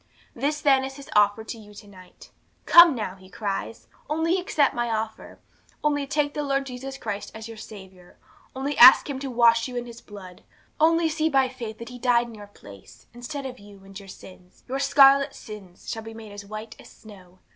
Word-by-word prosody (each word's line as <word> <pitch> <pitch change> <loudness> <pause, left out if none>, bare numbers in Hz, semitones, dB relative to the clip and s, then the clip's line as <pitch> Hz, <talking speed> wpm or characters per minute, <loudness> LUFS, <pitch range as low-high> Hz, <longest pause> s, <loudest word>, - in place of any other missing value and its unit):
'This 295 +5 -2
then 270 -2 +3
is 270 0 -6
His 280 -1 -12
offer 205 +1 +3
to 225 +1 -8
you 210 -1 -15
to 205 - -13
night. 185 -2 -16 0.3
"Come 340 -4 +8
now," 215 -5 -4
He 185 -1 -17
cries, 205 +2 -5 0.2
"only 325 +4 0
accept 305 -6 +1
My 240 0 -2
offer." 220 0 -5 0.5
Only 290 -2 0
take 290 +1 -1
the 295 - -3
Lord 275 -1 -1
Jesus 270 +1 -7
Christ 210 -5 -6
as 220 0 -8
your 225 - -9
Saviour; 190 -4 -13 0.4
only 275 +2 -3
ask 255 +2 +9
Him 275 -3 -4
to 275 0 -5
wash 230 -1 +3
you 250 - -9
in 245 0 -3
His 235 -1 -11
blood; 190 -4 -12 0.4
only 330 +1 +3
see, 315 0 0
by 270 -3 +2
faith, 235 -4 -8
that 235 - -9
He 250 0 -10
died 240 -1 +2
in 235 - -11
your 205 -2 -11
place, 120 - -16
instead 270 +4 -7
of 255 -1 -7
you; 200 -1 -16
and 195 0 -10
your 195 -1 -14
sins 180 -1 -15
your 265 +2 -3
scarlet 275 0 +5
sins 200 -5 -12
shall 225 - -4
be 225 0 -10
made 220 -2 -11
as 205 0 -10
white 215 +1 -8
as - - -14
snow. 185 -4 -16
235 Hz, 210 wpm, -24 LUFS, 205-275 Hz, 0.5 s, ask